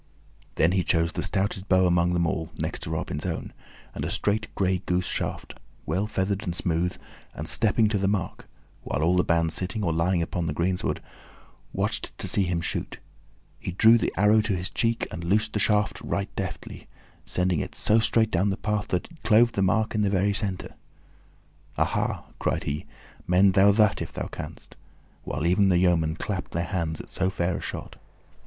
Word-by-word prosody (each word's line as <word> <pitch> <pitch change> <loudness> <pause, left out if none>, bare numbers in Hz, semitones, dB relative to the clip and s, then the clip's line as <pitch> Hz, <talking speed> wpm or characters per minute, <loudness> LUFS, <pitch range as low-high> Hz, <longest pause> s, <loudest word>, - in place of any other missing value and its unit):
Then 80 - +3
he 95 -1 +1
chose 85 -1 +1
the - - -2
stoutest 100 -1 -1
bow 95 0 +5
among 90 0 +2
them 85 -1 +2
all, 80 0 -2
next - - -3
to - - -5
Robin's 80 -2 -3
own, 90 -3 -4 0.4
and - - -5
a - - -2
straight 105 +1 0
gray 95 -1 +1
goose 90 0 +1
shaft, - - -4 0.3
well 95 +7 -1
feathered 100 -1 -1
and 90 -5 -3
smooth, 90 0 0 0.4
and - - -5
stepping 110 0 +3
to 105 -2 0
the 95 - +1
mark 100 -3 -2 0.3
while 75 - -2
all 85 +3 +3
the 90 - +3
band, 85 -1 +2
sitting 95 +5 -2
or 85 -4 +1
lying 85 +1 +1
upon 85 0 -3
the 75 - -1
greensward, 90 +4 -1 0.7
watched - - -2
to - - -4
see - - +2
him 90 -2 -1
shoot - - -3 0.6
he 90 - -5
drew 115 +5 +6
the - - 0
arrow 105 +3 +5
to 105 -2 -1
his 90 +2 -4
cheek 115 0 0
and 85 - -6
loosed 105 +5 +1
the 105 - 0
shaft 105 -2 +1
right 100 0 -3
deftly, 95 -3 -6 0.4
sending 90 -3 0
it - - -5
so 110 +2 +4
straight 110 0 +2
down 95 +3 +2
the 95 - -1
path 105 -1 -1
that 90 - -1
it 165 - -17
clove 115 +2 +5
the 100 - -1
mark 110 +4 +2
in 110 - +1
the 100 - +2
very 100 +1 +2
center. 100 -2 -3 1.0
"Aha!" - - 0 0.2
cried - - -1
he, 75 +1 -4 0.4
"mend 95 +2 +5
thou 100 +1 +6
that 105 0 +3
if - - -5
thou - - -4
canst;" - - -9 0.5
while 80 - -3
even 95 +3 +4
the 90 - +4
yeomen 85 -3 +2
clapped 95 0 -4
their 85 - 0
hands 85 -3 -2
at - - -9
so 95 0 0
fair 90 -2 -1
a - - -7
shot. - - -6
95 Hz, 195 wpm, -26 LUFS, 85-105 Hz, 1.0 s, drew